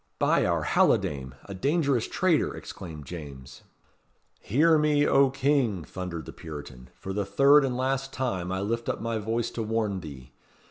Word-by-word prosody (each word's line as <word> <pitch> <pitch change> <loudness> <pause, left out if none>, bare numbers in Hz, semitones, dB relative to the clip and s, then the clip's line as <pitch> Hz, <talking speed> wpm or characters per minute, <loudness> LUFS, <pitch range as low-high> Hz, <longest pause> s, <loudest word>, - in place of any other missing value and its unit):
"By - - +2
our - - 0
halidame! 65 -3 +1
a 100 - -7
dangerous 140 - +1
traitor!" 185 -4 +1
exclaimed 80 -5 -9
James. 70 -5 -9 0.8
"Hear 155 +7 +3
me, 150 -1 +3
O 135 -1 +5
King!" 135 - +1
thundered 85 -3 -6
the - - -9
Puritan. 70 -6 -9
"For 95 - -6
the 105 +1 -1
third 140 +7 +5
and 125 -2 -1
last 135 +1 -1
time 95 -9 -2
I 95 0 -2
lift 115 +3 -2
up - - -2
my 115 -1 -2
voice 115 +2 -2
to 115 - -4
warn 110 -3 -1
thee. 70 -7 -10
110 Hz, 165 wpm, -27 LUFS, 85-135 Hz, 0.8 s, O